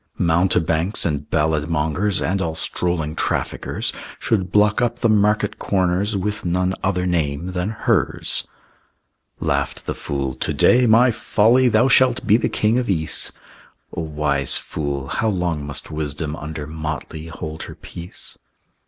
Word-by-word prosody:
Mountebanks 85 +1 +2
and 75 -3 -2
ballad 75 0 +1
mongers 85 +6 0
And 95 +1 0
all 80 -3 -2
strolling 80 -2 -1
traffickers - - -2 0.2
Should 95 -6 -1
block 105 +2 +3
up 120 -1 0
the 115 - +3
market 105 0 +2
corners 95 +2 0
With 105 +1 -3
none 90 +1 0
other 90 -1 0
name 85 -1 -1
than 90 +2 -2
hers. 110 - +1 0.9
Laughed - - -1
the - - -2
fool, 70 -2 -3
"To 75 - -2
day, 120 - +5
my 120 +3 +6
Folly, 115 +3 +3
Thou 110 +3 +4
shalt 130 -2 +4
be 105 0 +5
the 115 - +1
king 110 +3 +1
of 125 - -3
Ys!" 80 -5 +1 0.6
O - - -2
wise 75 -3 0
fool! 70 -3 -4
How 110 - -1
long 90 -6 -1
must 70 - -5
wisdom 75 0 -3
Under 75 -2 -6
motley 80 +1 -5
hold 80 -1 -7
her - - -9
peace? 85 +2 -10
90 Hz, 145 wpm, -21 LUFS, 80-105 Hz, 0.9 s, my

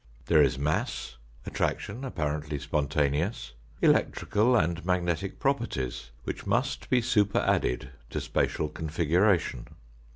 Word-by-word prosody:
There 80 +2 +5
is 65 -3 +3
mass, 75 -3 -2 0.3
attraction 115 +6 -2
apparently 75 - -2
spontaneous, 70 - -1 0.3
elec - - +5
trical 120 +3 +2
and 85 0 -1
magnetic 90 +1 -1
properties 90 - -1
which - - -5
must - - 0
be 125 -2 +3
superadded 100 - +1 0.2
to - - -3
spatial 75 - 0
configuration. 80 - +1
80 Hz, 105 wpm, -28 LUFS, 75-100 Hz, 0.3 s, There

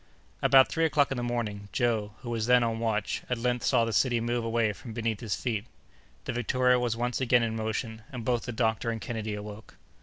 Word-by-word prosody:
About 135 -1 +6
three 165 - -1
o'clock 145 -2 +2
in 135 - -1
the - - -2
morning, 110 -4 -3
Joe, 110 -3 0
who 120 -2 -5
was 115 -1 -1
then 125 0 +5
on 115 -1 -1
watch, 110 -3 -1
at 125 - 0
length 125 0 -1
saw 115 - +3
the 115 - -3
city 120 -1 +2
move 120 +1 -1
away 115 -2 +1
from 115 +2 -10
beneath 115 -2 -2
his 110 -4 -2
feet. 110 -4 -2 0.6
The - - -2
Victoria 125 +1 +2
was 120 -2 -1
once 120 +2 -1
again 125 -2 +4
in 115 -1 -1
motion, 110 0 -3
and 125 -4 -6
both 120 -1 0
the 120 - -3
doctor 110 0 0
and 115 -1 -2
Kennedy 110 -2 -4
awoke. 105 +1 -9
115 Hz, 220 wpm, -28 LUFS, 110-125 Hz, 0.6 s, About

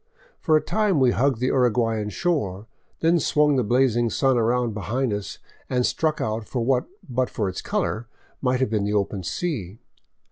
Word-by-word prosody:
For 155 -1 +3
a - - 0
time 205 -4 +1
we 130 -2 +4
hugged 130 -1 +1
the 130 +1 +1
Urguayan 115 -4 +1
shore, 105 - -1 0.4
then 165 +1 +4
swung 150 -1 +3
the 130 - +2
blazing 120 0 +2
sun 135 +3 +2
around 120 0 +1
behind 115 +3 -1
us 100 -2 -5 0.3
and 125 -1 +1
struck 155 -1 0
out 110 0 -2
for 120 -3 -2
what, 130 0 +2 0.2
but 130 -1 0
for 105 - -2
its 95 - -4
color, 115 +2 -2 0.3
might 130 -1 +1
have 130 - +2
been 105 -2 +1
the 105 - -1
open 100 -1 -1
sea. 105 - -3
125 Hz, 180 wpm, -24 LUFS, 110-135 Hz, 0.4 s, we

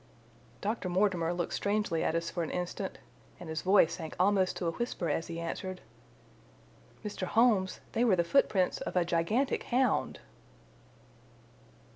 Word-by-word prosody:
Dr. 210 -2 -2
Mortimer 180 -3 +1
looked 175 -1 -2
strangely 205 -5 0
at 160 - 0
us 170 0 -1
for 175 - -2
an 160 - -2
instant, 180 +2 -4 0.4
and 175 -2 -8
his 160 0 -3
voice 185 -3 +4
sank 160 -3 -6
almost 190 0 +3
to 180 - -3
a 165 - +1
whisper 185 -3 -2
as 165 - -2
he 170 0 -5
answered. 185 +2 -4 1.3
"Mr. 200 -3 -3
Holmes, 215 -4 +3
they 235 - +1
were 225 -6 +4
the 170 - +2
footprints 185 -2 +2
of - - -4
a 180 -1 +3
gigantic 175 +11 +1
hound!" 260 +1 +1
185 Hz, 150 wpm, -31 LUFS, 170-205 Hz, 1.3 s, voice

